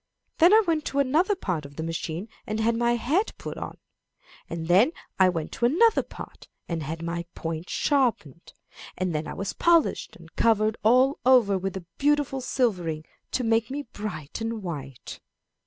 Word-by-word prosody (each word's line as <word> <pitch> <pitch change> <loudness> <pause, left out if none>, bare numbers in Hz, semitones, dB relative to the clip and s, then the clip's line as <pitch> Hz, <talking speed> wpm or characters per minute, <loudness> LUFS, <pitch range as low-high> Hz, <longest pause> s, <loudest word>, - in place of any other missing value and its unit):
Then 345 +2 +7
I 440 +1 +7
went 320 -3 +1
to 275 - -3
another 310 +9 +2
part 180 - -3
of 140 0 -12
the 160 - -4
machine 165 +3 -4 0.2
and 215 +1 -2
had 230 +1 +2
my 235 +1 +2
head 310 - 0
put - - -6
on; - - -7 0.7
and 165 -1 -5
then 205 - +5 0.3
I 190 -1 +6
went 165 -3 -3
to 235 - -1
another 415 - +4
part - - -11 0.2
and 165 -2 -3
had 160 +3 -5
my 170 0 -3
point 165 +1 -5
sharpened; 235 - 0 0.4
and 185 -1 -1
then 155 0 -2
I - - -5
was 195 +1 -3
polished, 340 -2 +2
and - - -16
covered 220 -1 +3
all 255 +5 +4
over 245 -6 +5
with 190 0 -3
a 180 - -9
beautiful 290 -2 +1
silvering, 180 - -1 0.3
to 255 - 0
make 225 -1 +1
me 285 +2 -4
bright 180 -4 -6
and 225 -2 -3
white.'" 140 -7 -7
215 Hz, 175 wpm, -26 LUFS, 170-265 Hz, 0.7 s, Then